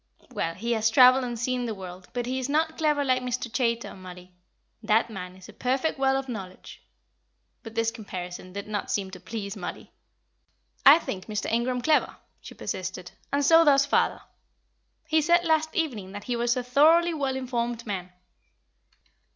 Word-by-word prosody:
"Well, 165 0 -2
he 235 +5 -3
has 220 -1 +2
travelled 255 +2 +6
and 240 -1 -4
seen 245 +1 -1
the 220 - -3
world; 185 -1 -10
but 245 -1 -3
he 260 +2 -2
is 260 +1 -3
not 320 +2 +1
clever 300 -3 +1
like 255 -1 +2
Mr. 250 -1 -4
Chaytor, 235 -3 -1
Mollie. 180 -1 -12 0.5
That 225 +1 +2
man 180 -3 -7
is 185 0 -14
a 215 - -13
perfect 265 +6 -1
well 270 0 +3
of 270 0 -4
knowledge." 195 -7 -8 0.8
But 225 0 -11
this 230 0 +1
comparison 185 -4 -7
did 200 +2 -6
not 210 -1 -3
seem 195 -2 -2
to 185 - -9
please 200 0 -6
Mollie. - - -7 1.0
"I 285 +3 +10
think 190 - -6
Mr. 210 -2 -3
Ingram 245 +2 0
clever," 310 -1 +2 0.2
she - - -12
persisted, 185 -1 -5 0.2
"and 280 0 +1
so 330 +2 +7
does 280 -2 +5
father. - - +1 0.8
He 315 -1 +2
said 345 +3 +3
last 315 -1 +2
evening 225 - -2
that 205 0 -7
he 245 - -2
was 240 +1 +1
a 250 - -1
thoroughly 320 +7 +4
well 275 -4 -1
informed 240 -2 -3
man. 185 -4 -5
240 Hz, 175 wpm, -26 LUFS, 200-270 Hz, 1.0 s, I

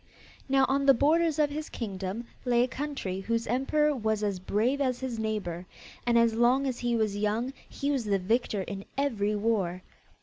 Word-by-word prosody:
Now 270 0 +4
on 275 +1 +1
the 275 - +8
borders 315 +4 +3
of 295 -1 +2
his 305 +1 -5
kingdom 200 0 -4 0.2
lay 245 -1 +3
a - - +1
country 265 -9 -4
whose 230 +4 -1
emperor 290 +5 +1
was 220 -3 -1
as 200 -3 -1
brave 230 +9 0
as 255 -3 0
his 250 -3 -3
neighbour, 195 -5 -3 0.4
and 235 -1 +4
as 230 -1 +4
long 245 +4 +3
as 255 -3 -2
he 240 -1 0
was 215 -3 0
young 215 +5 -1 0.2
he 285 +1 -2
was 265 -5 -1
the 200 -1 +2
victor 205 +1 0
in 195 0 -6
every 215 -7 0
war. 200 -4 0
235 Hz, 190 wpm, -28 LUFS, 205-270 Hz, 0.4 s, the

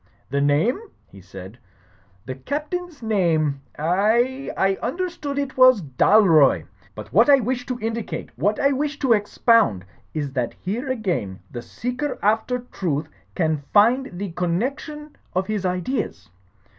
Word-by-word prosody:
"The 140 +1 +1
name," 145 - +2 0.3
he 100 - -15
said, 95 +4 -11 0.7
"the 130 - -4
Captain's 300 - -5
name. 160 -10 +1 0.2
I 220 - +1
— - - -16
^I 195 0 +1
understood 310 0 -3
it 280 -2 -3
was 255 -6 +6
Dalroy. 155 - +4 0.3
But - - -10
what - - +5
I 285 - +9
wish 250 +1 -2
to 250 -2 -3
indi 230 +1 -2
cate, 165 -6 -7
what 205 - 0
I 280 - +3
wish 285 +1 -2
to 265 -5 +3
expound, 205 - +2 0.3
is 145 -3 -2
that 125 -3 -2
here 235 +9 -4
again 180 - -2
the 120 - -6
seeker 250 - -4
after 225 +4 +1
truth 155 -4 -2 0.3
can 160 -3 +1 0.2
find 225 -1 +3
the 195 -1 -4
coimection 260 - -3 0.2
of 185 +1 +1
his 205 -3 -2
ideas. 180 - -3
210 Hz, 145 wpm, -22 LUFS, 155-260 Hz, 0.7 s, I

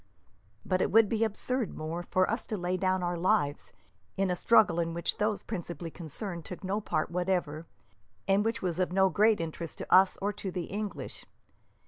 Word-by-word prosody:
"But 185 -1 +1
it - - +2
would 225 -1 +6
be 225 0 +1
absurd, 225 +1 -2
Moore, 160 +2 -4
for 185 +1 +1
us 225 +3 -3
to 215 - -2
lay 180 0 -1
down 185 0 0
our 175 -1 -1
lives 170 -6 +1 0.5
in 195 -1 +1
a - - +1
struggle 215 -3 +4
in 165 0 -1
which 170 +4 -1
those 210 0 0
principally 175 -5 -5
concerned 170 +2 -7
took 180 +4 -8
no 195 +3 -1
part 155 -5 -1
whatever, 175 -3 -1 0.6
and 195 +1 +3
which 225 -1 -2
was 175 -1 -1
of 180 -1 +1
no 190 +1 +4
great 210 +5 +3
interest 165 0 -5
either - - -4
to - - -1
us 190 0 +6
or 205 +1 -1
to 195 -1 -5
the 180 -1 -3
English. 205 0 -5
185 Hz, 195 wpm, -30 LUFS, 170-205 Hz, 0.6 s, would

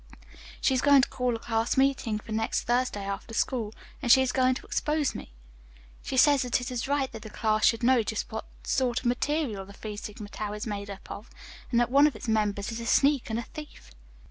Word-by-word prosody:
"She 265 - +2
is 255 - +1
going 285 -2 +6
to - - +2
call 250 -2 -1
a - - -5
class 225 +1 -1
meeting 265 -5 +2
for 215 - -10
next 220 +1 0
Thursday 240 -4 0
after 200 +3 -5
school, 230 -4 0 0.3
and 245 -4 +2
she 265 +3 +8
is 255 - 0
going 255 -1 +2
to - - -8
expose 300 -2 0
me. - - -8 0.7
She 260 - -4
says 285 +1 +6
that 250 -1 +1
it 250 0 -5
is 250 +1 -3
right 280 -1 0
that 225 - -8
the 220 - -9
class 215 0 +2
should 230 +1 +1
know 250 0 +5
just 215 -1 -3
what 220 0 -5 0.2
sort 255 -2 0
of - - -16
material 250 -3 0
the 200 +1 -13
Phi 210 +1 -7
Sigma 205 0 -8
Tau 210 0 -4
is 210 +3 -5
made 205 -2 -4
up 195 -1 -9
of, 210 - -8 0.4
and 235 - +2
that 240 0 +1
one 285 +2 +6
of 290 - -3
its 215 - -8
members 210 -1 0
is 225 - -5
a 230 - -5
sneak 275 +1 +3
and 220 - -1
a 235 - -2
thief." 295 - -11
235 Hz, 235 wpm, -28 LUFS, 215-260 Hz, 0.7 s, she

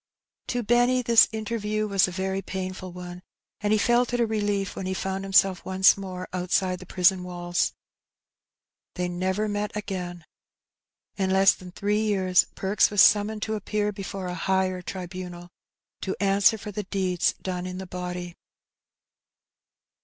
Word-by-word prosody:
To 245 -1 -1
Benny 245 +3 +3
the 235 -1 +6
interview 215 -1 -2
was 195 -2 +3
a - - -5
very 190 +1 -2
painful 185 -1 -5
one, 180 0 -8 0.4
and 205 0 -1
he 215 - +4
felt 240 +3 +2
it - - -1
a 235 - +3
relief 205 -3 -1
when 185 - -4
he 190 - -2
found 190 +1 -3
himself 195 -1 +3
once 190 +1 +5
more 185 -2 -6
outside 185 0 0
the 185 - -12
prison 185 0 +3
walls. 175 -1 -1 1.2
They 180 -1 -1
never 185 +4 -1
met 205 0 -2
again. 180 -5 -5 0.9
In 190 -2 0
less 190 +1 +5
than 180 -1 -12
three 205 +3 0
years 190 -4 +3
Perks 195 +2 +2
was 205 -1 +5
summoned 210 +1 +3
to 220 - -2
appear 210 0 -1
before 195 -1 -6
a 180 - -3
higher 185 0 0
tribunal, 180 -1 -7 0.5
to 190 - -2
answer 200 +2 +4
for 210 0 -7
the 210 - -3
deeds 185 -3 0
done 180 -1 -4
in 185 0 -6
the 190 - -6
body. 180 -1 -5
190 Hz, 155 wpm, -26 LUFS, 180-210 Hz, 1.2 s, the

